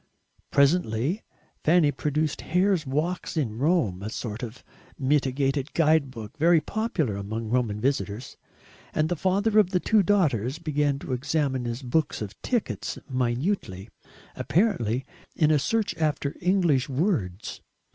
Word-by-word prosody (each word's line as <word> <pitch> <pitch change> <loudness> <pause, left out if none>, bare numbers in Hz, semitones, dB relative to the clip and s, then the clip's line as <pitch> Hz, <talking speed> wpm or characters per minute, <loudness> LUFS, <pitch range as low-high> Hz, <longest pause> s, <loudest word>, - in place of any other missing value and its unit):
Presently 140 - +2 0.4
Fanny 160 -2 +4
produced 150 +2 -1
Hare's 180 -2 +1
Walks 160 +6 -2
in 115 -7 -1
Rome, 135 - +1
a 105 - -4
sort 110 -1 -5
of 120 0 -7 0.3
mitigated 135 0 0
guide 155 -3 +3
book 115 -2 -9
very 165 +1 +5
popular 160 - -1
among 110 +3 -4
Roman 115 -4 0
visitors; 115 -2 -2 0.6
and 155 0 +2
the 175 - 0
father 200 +5 +2
of 200 -4 +4
the 185 -2 +1
two 215 +3 +3
daughters 150 - +1
began 150 -4 0
to 140 - -5
examine 135 -1 0
his 120 +3 -4
books 145 +4 0
of 105 -1 -7
tickets 240 -4 -2
minutely, 125 - -1 0.5
apparently 130 - +1 0.3
in 155 -2 +3
a 150 - +4
search 215 +3 0
after 150 -3 -1
English 175 -8 +2
words. 130 - -1
145 Hz, 135 wpm, -26 LUFS, 120-170 Hz, 0.6 s, very